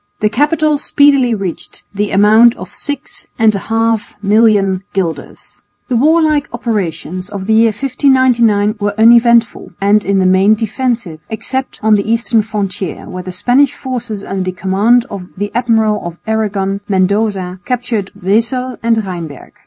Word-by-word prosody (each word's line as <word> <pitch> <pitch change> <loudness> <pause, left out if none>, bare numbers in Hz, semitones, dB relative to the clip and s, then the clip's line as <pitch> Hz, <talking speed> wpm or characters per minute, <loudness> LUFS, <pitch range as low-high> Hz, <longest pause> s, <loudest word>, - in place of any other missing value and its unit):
The 210 - +1
capital 300 +4 +1
speedily 275 -5 +3
reached 195 -4 -7
the 205 +1 -2
amount 220 +4 +5
of - - -10
six 290 -1 -7
and 220 -2 +3
a 200 - -2
half 225 -1 0
million 205 -3 +3
guilders. 180 -4 -5 0.3
The 250 - 0
warlike 305 +2 +2
operations 190 -5 -4
of 200 -2 -6
the 220 - +1
year 225 +1 +5
1599 235 -3 +2
were 205 +1 -2
uneventful 235 +1 +4
and 205 +1 +2
in 200 0 0
the 190 - +2
main 190 +3 +4
defensive, 225 - -3
except 260 +4 -3
on 220 0 +4
the 210 +1 +1
eastern 230 -1 +2
frontier 200 -4 -4
where 185 - -6
the 185 +1 -7
Spanish 255 +9 +2
forces 240 -6 -5
under 195 0 -4
the 185 0 -3
command 205 +6 +2
of 190 -3 -7
the 205 +1 -3
Admiral 225 -3 +1
of 170 0 -7
Aragon, 200 -3 -2
Mendoza, 190 -1 0
captured 235 -5 -2
Wesel 235 +6 -1
and 230 0 +2
Rheinberg. 170 -7 -8
220 Hz, 150 wpm, -14 LUFS, 195-240 Hz, 0.3 s, amount